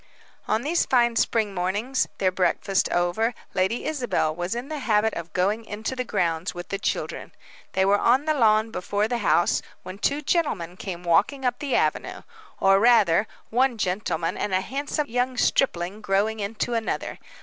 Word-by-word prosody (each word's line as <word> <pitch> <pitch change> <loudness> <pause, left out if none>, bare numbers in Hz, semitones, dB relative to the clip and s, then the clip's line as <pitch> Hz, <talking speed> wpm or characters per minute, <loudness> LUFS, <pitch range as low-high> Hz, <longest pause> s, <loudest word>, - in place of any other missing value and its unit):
On 220 - 0
these 335 +4 +1
fine 240 -2 +3
spring 220 -3 +1
mornings, 205 +9 -1
their 185 -1 +2
breakfast 190 +1 +1
over, 175 +7 0 0.2
Lady 190 +5 0
Isabel 245 - -1
was 175 +5 -3
in 240 +3 -4
the 305 -1 -4
habit 220 -3 +2
of 170 -1 -6
going 200 +6 0
into 220 +4 -5
the 255 - -2
grounds 170 -6 -1
with 175 0 -7
the 195 - -3
children. - - -3 0.4
They 190 0 +2
were 200 +1 +3
on 255 +5 +3
the 310 - +2
lawn 220 -4 +3
before 205 +2 -1
the 240 0 -2
house, 175 -5 +2 0.2
when 185 +2 -8
two 285 +6 0
gentlemen 205 - -1
came 180 -2 -6
walking 205 - +2
up 245 +1 0
the 285 -3 -1
avenue; - - -1 0.4
or, 195 0 +5
rather, 210 -4 +4 0.2
one 250 +1 +2
gentleman, 180 -4 -1
and 195 -3 -1
a 185 - +2
handsome 280 +8 -2
young 250 0 -1
stripling 195 -6 +1
growing 210 +2 0
into 215 +3 -2
another. 225 -1 -3
215 Hz, 170 wpm, -25 LUFS, 185-245 Hz, 0.4 s, or